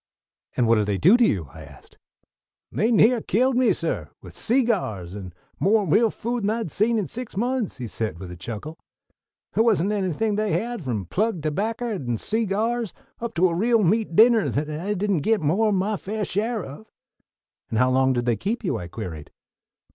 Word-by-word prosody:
"And 120 -2 +3
what 115 0 +5
did 105 -1 +1
they 100 -2 0
do 180 - +6
to 245 - +4
you?" 90 - +1
I 80 - -11
asked. 70 -3 -16 0.7
"They 220 - +1
near 230 +1 +5
killed 255 +6 +1
me, 250 -1 +4
suh, - - -2
with - - -13
seegyars, 205 - 0
and 95 -3 -7 0.3
mo' 210 +2 +3
real 210 +8 +4
food 235 +3 -3
than 200 - 0
I'd 220 -7 -2
seen 225 +3 +1
in 210 - 0
six 245 -1 -7
months," 245 - -1
he 125 - -5
said 110 -4 -3
with 90 0 -8
a - - -7
chuckle. 115 - -7 0.7
"The' - - +3
wasn't 210 -4 +2
anything 205 +1 -1
they 215 -1 0
had, 235 -1 -2
from 115 -8 -3
plug 190 - -1
tobacker 220 +10 -2
and 120 - -3
seegyars 225 0 -1 0.3
up 235 0 -5
to 180 +2 +4
a - - -2
real 225 +5 +2
meat 205 -1 +1
dinner 225 +1 +5
that 150 +1 -2
I 180 +7 -2
didn't 200 -2 0
git 220 +6 +2
mo' 180 +8 +2
'n 210 - +2
my 200 +3 0
faiah 210 +2 -3
share 220 +1 -1
of." 145 +11 -11 0.8
"And 110 - -2
how 125 +3 +3
long 130 0 +3
did 120 -1 -1
they 120 -2 +2
keep 220 - -3
you?" 185 - -1
I 90 - -7
queried. 85 -6 -7
200 Hz, 200 wpm, -24 LUFS, -, 0.8 s, do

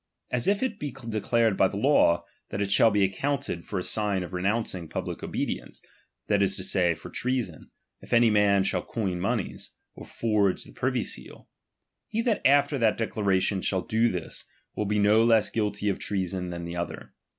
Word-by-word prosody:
As 125 -1 0
if 200 +4 +2
it 245 -5 -2
be 145 - -3
declared 115 -2 0
by 95 - +4
the 100 - -6
law, 95 -9 +3 0.2
that 100 - -4
it 100 -1 -1
shall 105 +3 +6
be 105 -2 +2
accounted 95 -2 -1
for 100 - -4
a 90 - -1
sign 100 -3 0
of 90 - -9
renouncing 95 -2 -1
public - - -4
obedience, - - -4 0.5
that 100 -1 +2
is 100 -1 +3
to - - -4
say, 90 -3 +2
for - - -11
treason, 125 -10 -3 0.3
if - - -15
any 115 -1 +5
man 100 -2 +4
shall 90 -2 0
coin 95 -5 -3
monies, 100 +2 -3 0.2
or - - -11
forge 105 -4 +1
the - - -13
privy - - 0
seal; - - -8 0.6
he 225 +2 -1
that 230 -4 +1
after 140 0 +3
that 110 -2 +2
declaration 100 -3 0
shall 95 0 0
do 115 +2 +2
this, 90 -5 -5 0.3
will 105 - -1
be 105 +1 0
no 105 +2 +5
less 110 -3 +3
guilty 105 -2 -1
of 100 - 0
treason 95 -2 -2
than 85 -1 -5
the 85 0 -6
other. 85 0 -5
105 Hz, 190 wpm, -27 LUFS, 95-115 Hz, 0.6 s, shall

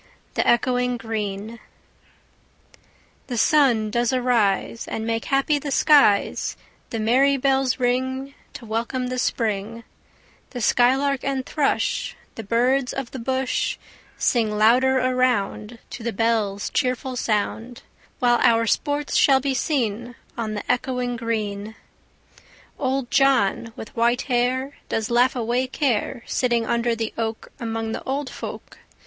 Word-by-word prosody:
THE - - +1
ECHOING 250 +1 +2
GREEN 220 -1 -4 1.7
The 245 - -4
sun 235 -6 +3
does 240 +2 +1
arise, 235 -4 +1
And 220 - -4
make 230 0 -2
happy 275 +2 +1
the 285 - -5
skies; 280 -8 +3 0.3
The 225 - -3
merry 265 +6 +3
bells 270 -1 +1
ring 260 +2 -1 0.2
To 235 - -9
welcome 235 +3 -2
the 255 0 -2
Spring; 225 -1 -2 0.7
The 250 - -6
skylark 265 +4 +2
and 270 -1 -2
thrush, 295 -3 -1 0.2
The - - -7
birds 250 +5 +1
of 270 -3 -5
the 265 - -6
bush, 260 +2 -1 0.4
Sing 230 -3 +2
louder 250 +5 +4
around 250 -3 0
To - - -7
the 235 +1 -2
bells' 215 -2 0
cheerful 255 0 -1
sound; 230 +1 -2 0.3
While 240 -1 +3
our 230 0 +4
sports 290 +5 -1
shall 270 -2 +5
be 270 0 -1
seen 240 -4 -1 0.2
On 220 -2 -3
the 205 - -4
echoing 250 -1 -1
green. 220 -2 -3 1.0
Old 265 -2 -1
John, 240 -5 +2
with 220 - -10
white 235 +1 +2
hair, 260 +2 -1
Does 225 +1 -2
laugh 245 +2 +3
away 245 +2 0
care, 250 -3 -1
Sitting 240 -2 0
under 235 0 0
the 225 -1 -3
oak, 220 -1 -3
Among 225 -1 -3
the - - -4
old 270 -1 -3
folk. - - -8
245 Hz, 130 wpm, -23 LUFS, 225-260 Hz, 1.7 s, shall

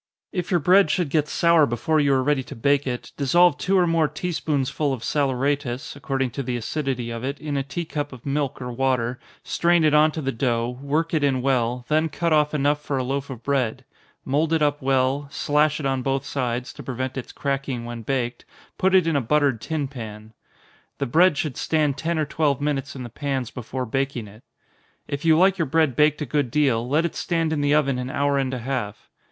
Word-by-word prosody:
If 180 -2 -3
your 175 - +3
bread 185 +6 +5
should 175 -5 0
get 150 0 +1
sour 170 -2 +4
before 120 +7 0
you 145 -1 +3
are 130 - +2
ready 145 0 +2
to - - -9
bake 140 +4 +1
it, 125 -1 -4
dissolve 155 +2 +4
two 195 +1 +2
or 180 - +4
more 165 -2 +2
tea 150 +5 -4
spoonsful 145 -2 -1
of 120 -3 -6
saleratus 140 -1 -1
(according 135 -3 -2
to 140 - -4
the 125 -2 -2
acidity 125 -1 -3
of 115 +1 -5
it) 140 +2 -3
in 150 -2 -4
a 140 - +1
tea 165 +5 -4
cup 145 -2 -4
of 125 -3 -12
milk 140 -1 -1
or 125 -1 -5
water, 125 -1 0 0.2
strain 170 -1 +2
it 155 -1 +4
on 155 +1 +5
to - - -4
the 135 - 0
dough, 120 0 -1
work 155 +4 -1
it 155 -3 +1
in 130 -3 +1
well 125 -2 0
then 155 +1 +2
cut 170 +1 0
off 150 0 +2
enough 145 +1 +1
for 140 -2 -2
a 130 - 0
loaf 135 +2 -3
of 125 -3 -8
bread 130 -5 -1 0.4
mould 150 +4 +1
it 160 -2 +2
up 145 0 +1
well, 135 +1 +1
slash 150 +2 +1
it 150 - -4
on 135 -1 0
both 135 +1 -1
sides, 125 -3 -3
to - - -10
prevent 130 0 -4
its 130 - -6
cracking 135 -3 -3
when 120 -1 -6
baked 120 0 -2 0.4
put 190 0 +3
it 185 -3 +5
in 165 -2 +1
a 140 - +2
buttered 140 -2 +1
tin 155 -4 -2
pan. 110 -4 -9 0.6
The - - -1
bread 165 +5 +4
should 145 -4 -2
stand 150 -3 +1
ten 165 +4 -2
or 155 - +1
twelve 145 -2 0
minutes 140 -1 -2
in 130 - -6
the 120 - -7
pans 135 -1 -3
before 125 +1 -5
baking 135 -2 -2
it. 105 +3 -15 0.7
If 140 +2 -4
you 160 -1 +5
like 190 +2 +4
your 165 - +1
bread 155 -2 +2
baked 150 +1 +3
a - - -3
good 145 0 0
deal, 125 -4 +1
let 155 +4 +2
it 170 - -2
stand 165 -2 0
in 150 - -1
the 145 +1 +3
oven 140 -4 +2
an 125 0 -4
hour 140 +1 +1
and 130 -1 -1
a 130 - -3
half. 120 -6 -4
140 Hz, 225 wpm, -23 LUFS, 130-155 Hz, 0.7 s, bread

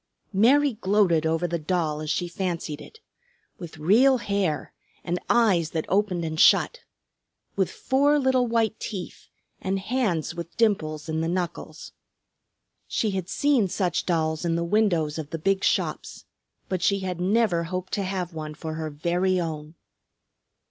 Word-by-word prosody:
Mary 265 +7 +4
gloated 185 -5 +3
over 165 +2 0
the 170 0 -2
doll 155 -2 -1
as 155 - -5
she 175 +3 0
fancied 170 -4 -4
it; 445 - -14 0.6
with 170 -3 -9
real 230 - +4
hair, 200 -8 -2 0.3
and 175 +1 -2
eyes 195 -9 +3
that 160 -1 -3
opened 190 -4 +1
and 160 0 -4
shut; 485 - +5 0.8
with 190 -2 +1
four 285 +3 +2
little 260 -3 +2
white 225 -1 0
teeth, 195 -5 -7 0.3
and 190 +1 -1
hands 195 - -1
with 170 -1 -8
dimples 155 -9 0
in 160 0 -1
the 165 - -1
knuckles. 175 0 -4 1.0
She 215 - 0
had 190 -2 -4
seen 275 -7 +2
such 180 -2 -1
dolls 160 -2 0
in 170 -1 0
the 170 - 0
windows 170 -6 +1
of 150 -2 -6
the 165 - -4
big 195 +4 0
shops. - - -1 0.4
But 185 -2 -2
she 200 +2 +2
had 180 -2 -4
never 190 -3 +2
hoped 185 +2 -5
to 200 - 0
have 185 -2 -3
one 155 -1 -6
for 160 +1 -6
her 155 0 -4
very 175 +5 0
own. 155 -2 -5
180 Hz, 155 wpm, -25 LUFS, 160-205 Hz, 1.0 s, shut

